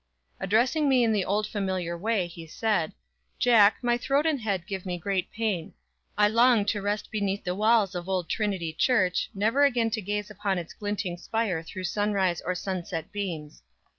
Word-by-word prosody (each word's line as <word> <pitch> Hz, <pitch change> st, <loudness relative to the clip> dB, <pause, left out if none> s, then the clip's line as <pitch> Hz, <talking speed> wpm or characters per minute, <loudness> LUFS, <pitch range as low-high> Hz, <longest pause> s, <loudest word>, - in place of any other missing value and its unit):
Addressing 245 Hz, -, +2 dB
me 255 Hz, -2 st, +4 dB
in 230 Hz, -, +3 dB
the 205 Hz, -3 st, +1 dB
old 210 Hz, +3 st, 0 dB
familiar 190 Hz, -5 st, -2 dB
way, 205 Hz, +1 st, 0 dB
he 170 Hz, -1 st, -10 dB
said: 195 Hz, -2 st, 0 dB, 0.4 s
"Jack, 220 Hz, -4 st, +5 dB
my 240 Hz, 0 st, +2 dB
throat 275 Hz, +4 st, +1 dB
and 305 Hz, -5 st, +1 dB
head 195 Hz, -5 st, -2 dB
give 190 Hz, -2 st, -5 dB
me 180 Hz, -2 st, -3 dB
great 190 Hz, +1 st, -2 dB
pain. 210 Hz, -7 st, -2 dB, 0.4 s
I 210 Hz, 0 st, +5 dB
long 230 Hz, 0 st, +4 dB
to 205 Hz, -, -4 dB
rest 205 Hz, +1 st, -2 dB
beneath 200 Hz, -2 st, -1 dB
the 180 Hz, -, -1 dB
walls 215 Hz, 0 st, +3 dB
of 175 Hz, +1 st, -5 dB
Old 185 Hz, -3 st, -1 dB
Trinity 190 Hz, -5 st, -1 dB
Church, 185 Hz, -1 st, +2 dB
never 225 Hz, +8 st, +2 dB
again 240 Hz, -5 st, +2 dB
to 220 Hz, 0 st, -1 dB
gaze 205 Hz, +1 st, -3 dB
upon 200 Hz, -1 st, -1 dB
its 170 Hz, -2 st, -6 dB
glinting 205 Hz, -4 st, -3 dB
spire 215 Hz, -4 st, -1 dB
through 185 Hz, +3 st, -8 dB
sunrise 195 Hz, -2 st, 0 dB
or 180 Hz, -, -2 dB
sunset 175 Hz, -3 st, -4 dB
beams. 175 Hz, -8 st, -5 dB
205 Hz, 180 wpm, -27 LUFS, 180-220 Hz, 0.4 s, Jack